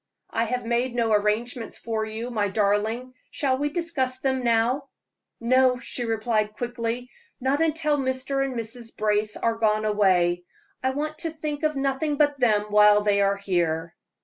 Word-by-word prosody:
"I 230 Hz, -, +1 dB
have 250 Hz, +1 st, -2 dB
made 240 Hz, +1 st, 0 dB
no 230 Hz, -2 st, +1 dB
arrangements 220 Hz, +3 st, 0 dB
for 220 Hz, -1 st, -2 dB
you, 225 Hz, +3 st, -5 dB
my 210 Hz, -3 st, 0 dB
darling; 215 Hz, +5 st, 0 dB, 0.2 s
shall 265 Hz, -2 st, 0 dB
we 290 Hz, +1 st, 0 dB
discuss 295 Hz, -6 st, -1 dB
them 260 Hz, -1 st, -1 dB
now?" 240 Hz, +4 st, +1 dB, 0.5 s
"No," 255 Hz, +1 st, +3 dB
she 245 Hz, -1 st, -4 dB
replied, 220 Hz, -1 st, 0 dB
quickly, 240 Hz, +1 st, -4 dB, 0.3 s
"not 270 Hz, +4 st, +1 dB
until 310 Hz, -2 st, +1 dB
Mr. 265 Hz, +1 st, -1 dB
and 270 Hz, -2 st, -3 dB
Mrs. 230 Hz, 0 st, -6 dB
Brace 210 Hz, 0 st, 0 dB
are 230 Hz, -, +1 dB
gone 215 Hz, -1 st, +1 dB
away. 185 Hz, -4 st, +2 dB, 0.4 s
I 260 Hz, -, +1 dB
want 305 Hz, +3 st, -3 dB
to 335 Hz, -, -2 dB
think 305 Hz, -2 st, -5 dB
of 305 Hz, -1 st, 0 dB
nothing 275 Hz, +2 st, 0 dB
but 290 Hz, -1 st, +2 dB
them 215 Hz, -4 st, +3 dB
while 210 Hz, 0 st, +6 dB
they 205 Hz, -1 st, +2 dB
are 200 Hz, 0 st, +2 dB
here." 170 Hz, -4 st, -1 dB
235 Hz, 165 wpm, -25 LUFS, 215-265 Hz, 0.5 s, while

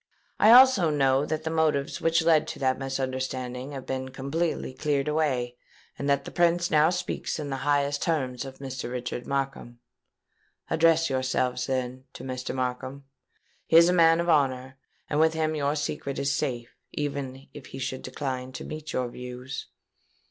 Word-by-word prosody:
I 215 Hz, -, +6 dB
also 245 Hz, -9 st, +7 dB
know 135 Hz, -1 st, +2 dB
that 155 Hz, 0 st, -2 dB
the 160 Hz, -, -2 dB
motives 155 Hz, -4 st, 0 dB
which 165 Hz, 0 st, +2 dB
led 160 Hz, -2 st, +4 dB
to -, -, -5 dB
that 130 Hz, -1 st, 0 dB
misunderstanding 130 Hz, 0 st, -3 dB
have 135 Hz, -2 st, -7 dB
been 130 Hz, 0 st, -3 dB
completely 140 Hz, +2 st, -2 dB
cleared 145 Hz, 0 st, -1 dB
away, 130 Hz, -6 st, 0 dB, 0.4 s
and 140 Hz, -, -3 dB
that 140 Hz, 0 st, +2 dB
the -, -, -7 dB
Prince 175 Hz, 0 st, +2 dB
now 155 Hz, 0 st, +5 dB
speaks 180 Hz, 0 st, -3 dB
in 145 Hz, -3 st, -5 dB
the 135 Hz, -, -2 dB
highest 145 Hz, 0 st, +1 dB
terms 130 Hz, -7 st, -1 dB
of 135 Hz, -1 st, -9 dB
Mr. 130 Hz, -3 st, -6 dB
Richard 125 Hz, 0 st, -4 dB
Markham. 135 Hz, -3 st, -3 dB, 0.9 s
Address 165 Hz, 0 st, +4 dB
yourselves, 130 Hz, -1 st, 0 dB
then, 130 Hz, -1 st, -3 dB
to -, -, -9 dB
Mr. 130 Hz, 0 st, -4 dB
Markham: 130 Hz, +2 st, -3 dB, 0.6 s
he 165 Hz, -, +6 dB
is 170 Hz, +1 st, +8 dB
a -, -, +3 dB
man 165 Hz, -1 st, +5 dB
of 170 Hz, -, -1 dB
honour; 130 Hz, -4 st, +1 dB, 0.3 s
and 150 Hz, -, -1 dB
with 160 Hz, 0 st, +4 dB
him 155 Hz, -1 st, 0 dB
your 145 Hz, -1 st, 0 dB
secret 145 Hz, -2 st, -3 dB
is 140 Hz, 0 st, 0 dB
safe, 120 Hz, -5 st, -3 dB, 0.2 s
even 140 Hz, -2 st, -4 dB
if 145 Hz, -, -10 dB
he -, -, -9 dB
should 130 Hz, 0 st, -4 dB
decline 130 Hz, -1 st, -4 dB
to 125 Hz, -, -7 dB
meet 155 Hz, 0 st, -7 dB
your 125 Hz, -1 st, 0 dB
views.' 125 Hz, +2 st, -7 dB
140 Hz, 170 wpm, -27 LUFS, 130-155 Hz, 0.9 s, is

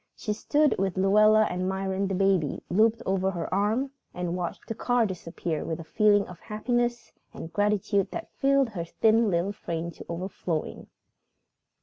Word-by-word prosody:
She 210 Hz, -, -3 dB
stood 295 Hz, +7 st, +2 dB
with 190 Hz, -1 st, -1 dB
Luella 215 Hz, +3 st, +5 dB
and 180 Hz, +1 st, -2 dB
Myron, 190 Hz, 0 st, -1 dB
the 195 Hz, -, -2 dB
baby 190 Hz, -6 st, +1 dB
looped 220 Hz, +5 st, +3 dB
over 190 Hz, 0 st, +1 dB
her 175 Hz, -2 st, -4 dB
arm, 220 Hz, +8 st, +1 dB, 0.2 s
and 180 Hz, -1 st, -2 dB
watched 175 Hz, -2 st, -4 dB
the -, -, -3 dB
car 245 Hz, +1 st, +1 dB
disappear 170 Hz, -4 st, -4 dB
with 160 Hz, 0 st, -4 dB
a -, -, -6 dB
feeling 205 Hz, +4 st, +3 dB
of 180 Hz, -2 st, -11 dB
happiness 240 Hz, +2 st, -2 dB, 0.2 s
and 165 Hz, -, -8 dB
gratitude 205 Hz, -1 st, +1 dB
that 335 Hz, -, -7 dB
filled 275 Hz, -2 st, +2 dB
her 185 Hz, -6 st, -4 dB
thin 220 Hz, +5 st, +3 dB
little 175 Hz, +2 st, 0 dB
frame 170 Hz, -4 st, -4 dB
to -, -, -12 dB
overflowing. 170 Hz, -2 st, -4 dB
195 Hz, 160 wpm, -27 LUFS, 180-220 Hz, 0.2 s, Luella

